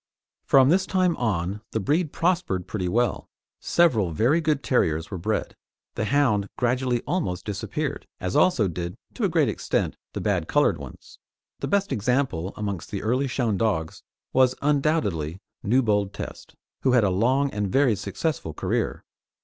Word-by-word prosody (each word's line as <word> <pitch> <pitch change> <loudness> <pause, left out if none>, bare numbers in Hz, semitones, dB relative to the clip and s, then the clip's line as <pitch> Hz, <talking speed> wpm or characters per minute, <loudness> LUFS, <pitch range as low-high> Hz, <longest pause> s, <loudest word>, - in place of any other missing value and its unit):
From 135 -1 +6
this 185 +3 +3
time 185 -3 +2
on 100 -3 -1
the 110 - +1
breed 150 - 0
prospered 165 - 0
pretty 95 -1 -3
well; 120 +5 0 0.3
several 125 - +3
very 120 - +2
good 155 -3 0
terriers 80 - +1
were 95 - -4
bred, 105 +5 -2 0.4
the 110 - -2
hound 110 -6 +2
gradually 125 0 +1
almost 90 - -2
disappeared, 100 -2 -3
as 90 0 -3
also 130 - +4
did 85 0 -4 0.2
to - - -1
a - - +2
great - - +3
extent - - -1 0.2
the - - -3
bad - - 0
coloured - - +2
ones. - - -12 0.4
The - - -3
best 200 0 +1
example 115 -6 0
amongst 100 -5 -4
the 100 - -4
early 130 +5 +1
shown 120 -5 0
dogs 90 -7 -1 0.3
was 130 -1 +4
undoubtedly 135 - 0 0.2
Newbold 105 -4 +2
Test, - - -8 0.3
who 130 - +2
had 120 -3 +5
a 100 - +2
long 130 +9 +2
and 105 -2 -2
very 135 -5 +3
successful 100 - -3
career. - - -2
115 Hz, 155 wpm, -25 LUFS, 95-140 Hz, 0.4 s, From